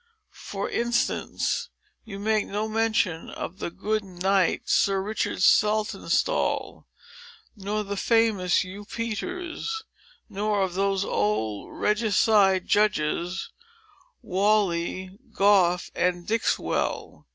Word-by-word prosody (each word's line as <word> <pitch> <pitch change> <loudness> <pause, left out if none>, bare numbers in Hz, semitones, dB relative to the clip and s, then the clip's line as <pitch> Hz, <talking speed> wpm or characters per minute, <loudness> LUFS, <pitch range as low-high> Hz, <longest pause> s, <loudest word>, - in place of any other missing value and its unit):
For - - -3
instance, 240 0 -1 0.4
you 200 -3 -7
make 215 +1 0
no 210 +2 -2
mention 215 -6 0
of 185 +4 -7
the - - -3
good 210 +4 -2
knight, 190 0 +1
Sir 195 -1 +3
Richard 200 -1 -2
Saltonstall, 215 - +1 0.7
nor 210 +1 -2
of 210 - -8
the 200 - -3
famous 215 -4 +2
Hugh 190 +2 -9
Peters, 355 - -4 0.4
nor 205 -1 0
of 185 -2 -2
those 195 +1 0
old 105 0 -2
regicide 210 -3 +3
judges, 180 -3 0 0.7
Whalley, 190 -2 0
Goffe, 190 -3 +3
and 175 -1 0
Dixwell. 225 +3 -1
200 Hz, 100 wpm, -26 LUFS, 185-215 Hz, 0.7 s, Sir